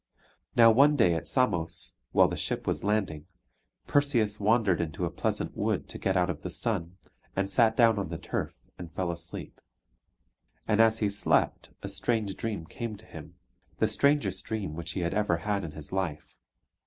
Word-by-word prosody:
Now 115 -1 +8
one 140 +6 +5
day 90 -11 +4
at 85 - -3
Samos, 90 -11 +1 0.2
while - - +5
the - - -3
ship - - -2
was - - -1
lading, 95 -7 -1 0.6
Perseus 120 -8 +1
wandered 105 -4 +3
into 80 -3 -3
a - - -3
pleasant - - -2
wood - - -1
to - - -7
get 95 -1 +1
out 90 -1 +3
of 85 -5 -4
the - - -5
sun, 85 +3 -2 0.4
and 95 0 0
sat 110 +3 +3
down 115 -3 +5
on 95 - -3
the 80 - -4
turf - - -4 0.2
and 85 -2 -8
fell 90 +1 -2
asleep. 85 0 -7 1.1
And 110 0 +4
as 115 0 +4
he - - +2
slept 100 - +1
a - - -3
strange 110 -5 -1
dream 105 -7 -4
came 110 +4 -6
to 110 - -15
him 80 -7 -11 0.4
the - - +2
strangest 145 +1 +1
dream 105 -8 -4
which 85 +1 -5
he 95 - -2
had 85 0 -1
ever 105 -5 +1
had 100 +3 -2
in 80 -3 -6
his 75 -1 -8
life. 90 -6 -3
100 Hz, 185 wpm, -28 LUFS, 85-110 Hz, 1.1 s, Now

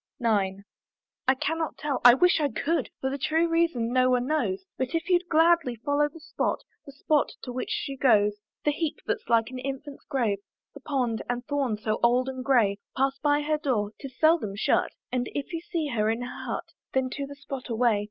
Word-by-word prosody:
IX. 200 -5 +1 0.6
I 260 - +5
cannot 320 0 -1
tell; 290 -3 -2
I 245 0 +10
wish 360 +3 +4
I 290 - +2
could; 300 +8 -1
For 265 - -1
the 280 - -3
true 320 +5 +2
reason 330 -9 +1
no 255 0 +4
one 250 -1 +2
knows, 315 +6 -1
But 260 +5 -2
if 330 - -1
you'd 360 -1 +2
gladly 325 -5 +4
view 285 +5 +1
the 330 - -12
spot, 310 - -2 0.2
The - - -8
spot 290 +1 +1
to 250 - -5
which 250 +1 -4
she 275 -1 -3
goes; 210 -6 +4 0.3
The 295 - +4
heap 310 +1 -2
that's 455 - -3
like 230 0 +3
an 255 - -6
infant's 275 +2 -6
grave, 235 -8 0 0.3
The 285 - -10
pond 255 -5 -1
and 245 0 -2
thorn, 275 -6 0
so 215 0 -2
old 250 +2 +3
and 260 -1 -5
grey, 230 -7 +3 0.2
Pass 270 0 +1
by 290 0 +2
her 305 0 0
door 220 -8 0
'tis 265 -2 -9
seldom 315 -11 +3
shut 200 - +1 0.2
And 250 -1 -1
if 290 +5 -4
you 330 - -1
see 335 -6 -2
her 215 -4 +1
in 225 +2 -1
her 245 - -7
hut, - - -3 0.3
Then 260 -1 +1
to 280 0 -4
the 285 - -9
spot 275 -2 -7
away! 230 -2 +2
270 Hz, 210 wpm, -27 LUFS, 240-300 Hz, 0.6 s, I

